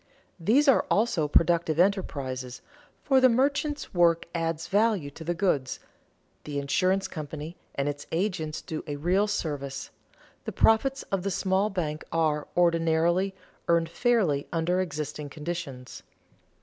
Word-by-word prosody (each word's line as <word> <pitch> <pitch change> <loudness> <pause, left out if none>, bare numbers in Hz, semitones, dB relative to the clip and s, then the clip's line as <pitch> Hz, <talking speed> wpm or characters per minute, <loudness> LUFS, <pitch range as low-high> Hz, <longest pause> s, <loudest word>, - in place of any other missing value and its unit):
These 240 - +3
are 270 - +5
also 200 -8 +2
productive 165 0 +2
enterprises, 135 -10 -1 0.4
for 265 -2 +4
the 255 - +7
merchant's 280 +4 0
work 170 -2 +3
adds 165 -1 -2
value 205 -8 +1
to 160 - -10
the 175 +2 -2
goods, 150 -8 0 0.6
the 145 -1 -5
insurance 185 +7 +1
company 155 +1 -7 0.2
and 140 0 -1
its 145 0 -4
agent 165 -3 -2
do 155 - -5
a 145 - -3
real 180 +8 +1
service, 145 -9 -4 0.5
the - - -4
profits 265 +5 +3
of 195 -2 0
the 195 - -2
small 195 +2 +1
bank 160 -6 -3
are, 155 -2 0
ordinarily, 170 +2 +2 0.3
earned 170 -1 +2
fairly 190 - +1
under 175 +2 +1
existing 150 -3 -4
conditions. 150 -5 -6
170 Hz, 135 wpm, -27 LUFS, 150-195 Hz, 0.6 s, the